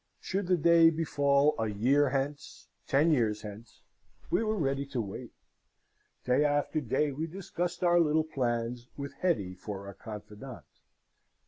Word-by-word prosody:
Should 195 -1 -3
the 180 -1 +3
day 165 0 +6
befall 145 -2 +2
a 110 - 0
year 130 +8 +2
hence 140 +2 -4 0.2
ten 150 +4 +3
years 110 -7 +1
hence 110 +2 -11 0.5
we - - +2
were 215 0 0
ready 140 -4 0
to 135 -3 -3
wait. 100 -4 -5 0.9
Day 125 +3 +3
after 145 +1 +1
day 135 +3 0
we 155 +4 -3
discussed 175 0 -4
our 175 0 +5
little 155 -1 +3
plans, 120 -4 -2
with 140 0 -6
Hetty 125 - -1
for 100 +2 -7
our 100 - -8
confidante. 105 +4 -9
140 Hz, 145 wpm, -30 LUFS, 115-160 Hz, 0.9 s, day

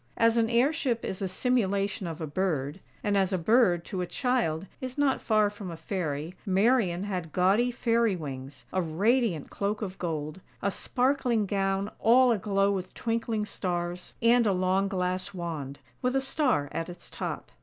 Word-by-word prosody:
As 230 0 +4
an 225 -1 +2
airship 245 0 +1
is 190 - -4
a 195 - 0
simulation 200 -2 0
of 165 -1 -5
a 160 - -3
bird; 150 -1 -1 0.2
and 205 -1 +1
as 195 -1 +2
a 185 - +1
bird, 180 -2 +3
to 185 - -3
a 180 - -2
child, 230 - 0 0.2
is 255 0 -5
not 285 -2 +2
far 215 -2 +3
from 205 -3 -7
a 165 - -6
fairy, 160 -2 -3
Marian 195 -2 +2
had 180 -5 -4
gaudy 195 +8 +3
fairy 235 -3 +1
wings, 140 -4 -7
a 185 - +2
radiant 190 - +1
cloak 205 +2 -2
of 190 -2 -6
gold, 155 0 -3 0.2
a 200 - 0
sparkling 250 -2 +1
gown 195 0 0
all 250 +2 +6
aglow 200 -2 +2
with 185 -2 -3
twinkling 225 -2 -1
stars, 175 -3 -3
and 235 0 +5
a 200 - +3
long 185 +2 +2
glass 185 +1 -2
wand, 155 -6 -4 0.2
with 250 0 0
a - - +4
star 265 - +1
at 165 +1 -3
its 175 - -10
top. - - -5
195 Hz, 175 wpm, -28 LUFS, 175-230 Hz, 0.2 s, all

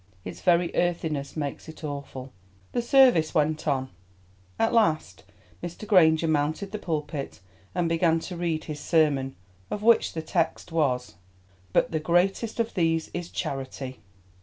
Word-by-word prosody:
Its 90 -2 -7
very 175 -1 +2
earthiness 160 -5 -1
makes 145 +1 -4
it 160 - -12
awful. 140 -3 -6 0.4
The 240 - 0
service 240 - +5
went 155 0 +1
on. 130 -2 0 0.7
At 225 - +1
last 155 - +1 0.4
Mr. 175 +5 -7
Granger 165 -5 +5
mounted 155 +6 0
the 215 - -4
pulpit 150 - -4 0.4
and 175 -2 +1
began 165 0 +2
to 180 - -6
read 170 -2 -1
his 150 -2 -6
sermon, 145 -5 +2 0.3
of 210 - -4
which 230 0 +4
the 160 - -4
text 165 +1 -1
was, 125 - 0 0.5
"But - - +2
the 160 - 0
greatest 185 +8 +1
of 230 0 0
these 165 -3 0
is 175 -1 -4
charity." 130 -1 -5
160 Hz, 145 wpm, -26 LUFS, 145-175 Hz, 0.7 s, service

